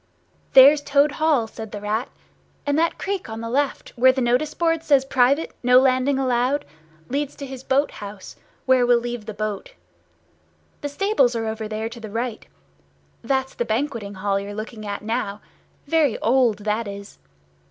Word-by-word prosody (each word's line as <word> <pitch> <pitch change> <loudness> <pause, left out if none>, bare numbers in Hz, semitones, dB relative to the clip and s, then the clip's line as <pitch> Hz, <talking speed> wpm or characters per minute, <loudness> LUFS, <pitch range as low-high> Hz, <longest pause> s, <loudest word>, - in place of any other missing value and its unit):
"There's 280 +3 +8
Toad 285 +1 +3
Hall," 300 -6 +2
said 220 -1 -9
the 210 - -6
Rat; 210 +3 -2 0.6
"and 285 0 +1
that 335 +1 +1
creek 390 - -4
on 220 0 -6
the 230 0 -5
left, 280 +2 -1
where 260 +1 +6
the 260 - -3
notice 250 +5 +1
board 330 -1 +1
says, 280 -4 +3
'Private. 270 +3 +2
No 250 0 +5
landing 260 +1 +2
allowed,' 255 +1 +1 0.4
leads 285 +1 -2
to 280 - -7
his 265 -1 -9
boat 275 +2 +1
house, 200 -2 -9 0.3
where 260 -1 +4
we'll 245 0 +4
leave 240 -2 -5
the 215 - -5
boat. 215 - -4 1.1
The 290 - -3
stables 285 - +1
are 225 -1 -2
over 220 0 -4
there 215 +1 -3
to 235 +1 -9
the 220 -2 -8
right. 230 +1 -4 0.8
That's 265 +2 -1
the - - -2
banqueting 225 -3 -3
hall 195 +1 0
you're 200 +1 -7
looking 215 0 -7
at 200 0 -5
now—very 235 +6 -2
old, 240 -3 +2
that 215 +1 -1
is. 200 0 -9
245 Hz, 170 wpm, -22 LUFS, 220-280 Hz, 1.1 s, There's